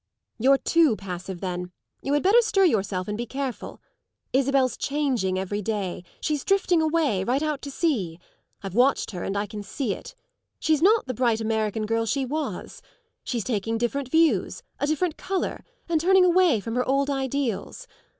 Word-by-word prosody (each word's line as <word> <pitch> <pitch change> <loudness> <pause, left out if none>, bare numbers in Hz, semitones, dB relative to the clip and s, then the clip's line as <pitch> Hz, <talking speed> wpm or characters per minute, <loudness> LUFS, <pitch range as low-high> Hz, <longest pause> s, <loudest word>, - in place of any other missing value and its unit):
"You're 270 +4 +5
too 320 -5 +3
passive 180 -2 -7
then. 180 -1 -4 0.3
You 275 - -1
had 290 - +2
better 420 +6 +6
stir 410 -4 +2
yourself 195 - 0
and 210 - -2
be 240 +2 -4
careful. 265 -1 -5 0.5
Isabel's 265 -1 +2
changing 260 -10 0
every 195 +2 -2
day; 200 -4 -3 0.2
she's 300 -3 -1
drifting 380 -4 +2
away 310 - +1
right 255 +8 0
out 300 -2 -1
to 285 - -6
sea. 225 - -1 0.4
I've 195 -2 -5
watched 250 +3 +2
her 180 -3 -5
and 195 - -2
I 205 - 0
can 210 0 -7
see 205 +2 -3
it. - - -10 0.4
She's 315 -1 +1
not 425 +5 +4
the 255 - -3
bright 235 -2 +1
American 220 -1 -1
girl 225 +1 0
she 270 +4 0
was. 300 +4 -4 0.4
She's 235 -4 -2
taking 225 0 -1
different 245 +3 -2
views, 270 - +2 0.2
a 285 - 0
different 310 +2 0
colour, 380 -1 -3 0.2
and 330 -2 +1
turning 375 +2 +5
away 355 - +4
from 225 +2 -5
her 250 +1 0
old 275 +1 +2
ideals. 270 - -2
260 Hz, 175 wpm, -25 LUFS, 210-310 Hz, 0.5 s, better